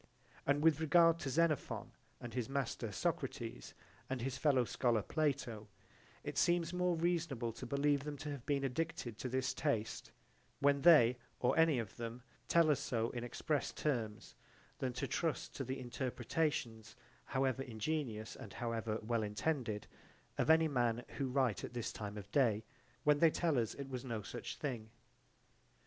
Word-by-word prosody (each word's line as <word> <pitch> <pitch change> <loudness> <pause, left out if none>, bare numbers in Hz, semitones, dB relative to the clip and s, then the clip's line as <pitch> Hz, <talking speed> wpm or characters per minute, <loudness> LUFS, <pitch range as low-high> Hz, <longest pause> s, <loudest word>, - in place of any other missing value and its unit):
And 145 +1 +3
with 160 -2 +5
regard 165 +1 +5
to 140 - -3
Xenophon 155 +1 +1 0.3
and 120 - -7
his 125 -1 -2
master, 130 -5 -2
Socrates, - - -3 0.3
and 130 0 -1
his 130 +2 -2
fellow 130 -2 +3
scholar 115 -3 +1
Plato, 135 -8 -1 0.6
it - - -2
seems 175 0 +2
more 180 -1 +2
reasonable 160 -9 0
to - - -7
believe 140 0 +2
them 145 -1 -5
to 150 +1 -5
have 140 -4 -6
been 140 -2 +1
addicted 135 -5 -2
to 130 - -3
this 130 +1 0
taste 115 -8 -1 0.5
when 140 0 +3
they 125 -8 +7 0.2
or 125 - +2
any 160 -4 +5
of 110 -5 -4
them 120 +1 -5 0.2
tell 165 -2 +5
us 145 - +2
so 115 -1 -1
in 120 -1 -4
express 145 +4 -1
terms 115 -8 -2 0.5
than 130 - -1
to 130 +3 -2
trust 160 +4 -1
to 135 - -2
the 130 +1 -4
interpretations, 125 -2 -2 0.3
however 130 0 0
ingenious 115 -2 -3
and - - -9
however 115 -2 -2
well 115 +1 0
intended, 110 0 -1 0.5
of - - 0
any 160 0 +6
men 120 -4 +1
who 135 - +1
write 130 -5 +1
at - - -6
this 120 - -2
time 105 -1 -5
of 100 0 -9
day, 110 -5 +3 0.4
when 150 -1 +4
they 165 - +7
tell 155 -4 +1
us 115 -2 -1
it 140 -1 -6
was 130 -2 -5
no 115 -5 -3
such 120 +2 -6
thing. 120 -7 -4
130 Hz, 165 wpm, -36 LUFS, 115-150 Hz, 0.6 s, they